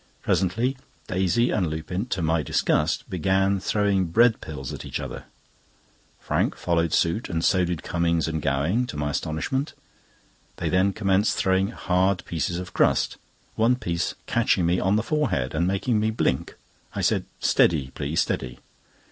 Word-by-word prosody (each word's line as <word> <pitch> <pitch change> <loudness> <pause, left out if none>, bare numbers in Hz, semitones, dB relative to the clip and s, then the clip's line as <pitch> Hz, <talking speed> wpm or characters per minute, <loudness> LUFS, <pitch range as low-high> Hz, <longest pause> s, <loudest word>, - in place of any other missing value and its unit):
Presently 115 +9 +1 0.3
Daisy 95 +7 +1
and 95 -5 +1
Lupin, 90 +7 -4
to 95 -8 -2
my 80 0 +2
disgust, - - 0
began 95 +2 +1
throwing 100 -1 +1
bread 115 +7 +3
pills 70 -5 -6
at - - -7
each - - -4
other. - - -7 0.9
Frank - - 0
followed 85 -2 0
suit, 85 +9 +1
and 80 -1 -1
so 95 -1 +3
did 85 -2 -3
Cummings 85 -2 0
and 80 -1 -2
Gowing, 80 - 0
to 75 - -6
my 75 0 -1
astonishment. 80 - -2 0.8
They - - -2
then 95 +2 +3
commenced 100 0 +1
throwing 95 +1 +2
hard 95 -3 0
pieces 85 +1 -2
of 90 0 -7
crust, - - +2 0.4
one 115 +3 +3
piece 85 -8 -2
catching 90 - +2
me 90 +2 +2
on 95 +2 +2
the 110 - +1
forehead, 115 - 0
and 85 +3 +1
making 100 +4 +1
me 110 +1 +1
blink. 110 - -1 0.4
I - - -2
said: - - +1
"Steady, 70 -6 +2
please; 70 +3 -1
steady!" 60 -1 -3
90 Hz, 155 wpm, -25 LUFS, 80-100 Hz, 0.9 s, bread